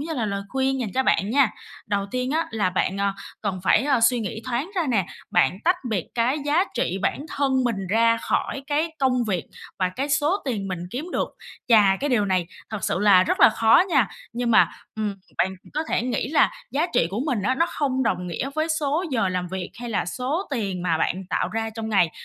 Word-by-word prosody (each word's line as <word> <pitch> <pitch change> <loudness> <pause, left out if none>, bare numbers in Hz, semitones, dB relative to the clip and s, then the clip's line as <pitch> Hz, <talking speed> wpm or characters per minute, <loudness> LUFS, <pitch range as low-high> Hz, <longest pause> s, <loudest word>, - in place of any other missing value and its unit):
như 320 +2 -4
là 235 -6 -1
lời 200 -1 -2
khuyên 265 +1 0
dành 220 - -2
cho 265 - +2
bạn 205 -5 +1
nha. 275 -1 +4 0.4
Đầu 200 -1 -1
tiên 255 +2 -2
á 320 +2 0
là 205 -5 0
bạn, 185 +1 0
ờ, 200 0 +1 0.3
cần 195 -3 -3
phải, - - +4
a, 275 -4 +2
suy 240 +1 +4
nghĩ 220 0 -4
thoáng 255 +7 -2
ra 355 - +2
nè, 210 -8 +1 0.2
bạn 155 +8 +2
tách 355 +2 +4
biệt 200 -7 -1
cái 245 +5 +1
giá 305 +6 +3
trị 190 -5 -1
bản - - 0 0.2
thân 265 -2 +2
mình 200 -6 -1
ra 230 +3 +3
khỏi 275 +3 -2
cái 305 +3 0
công 255 -3 +2
việc 185 -6 -1 0.3
và 185 - +2
cái 260 +10 -3
số 295 +7 +1
tiền 210 -8 -2
mình 185 - -3
kiếm 275 - -4
được. - - 0 0.4
Và 205 -4 +6
cái 290 - -1
điều 215 -5 +3
này 185 -3 0 0.2
thật 215 -2 -4
sự - - 0
là 200 -2 +6
rất - - -1
là - - +9
khó 225 +5 +5
nha. 275 - +3 0.2
Nhưng 240 0 -1
mà, 225 - +6 0.3
ừm, 210 -2 -2 0.2
bạn 190 - +2 0.2
có 310 - 0
thể - - +1
nghĩ 245 -1 -1
là 315 - +4 0.2
giá 305 +5 +1
trị - - +4
của 205 +5 -2
mình 245 -9 0
á, 255 +6 +1
nó 330 +6 +2
không 265 -5 -1
đồng 180 -8 -1
nghĩa 215 +10 -3
với 315 +1 0
số 310 +2 0
giờ 225 -7 +1
làm 180 -1 -2
việc 185 0 -5
hay 240 - -5
là 210 - 0
số 275 - -2
tiền 200 -9 -2
mà 165 -3 +1
bạn 185 +3 -1
tạo - - 0
ra 225 0 -3
trong 220 0 -5
ngày. 195 -6 +3
230 Hz, 230 wpm, -24 LUFS, 195-275 Hz, 0.4 s, là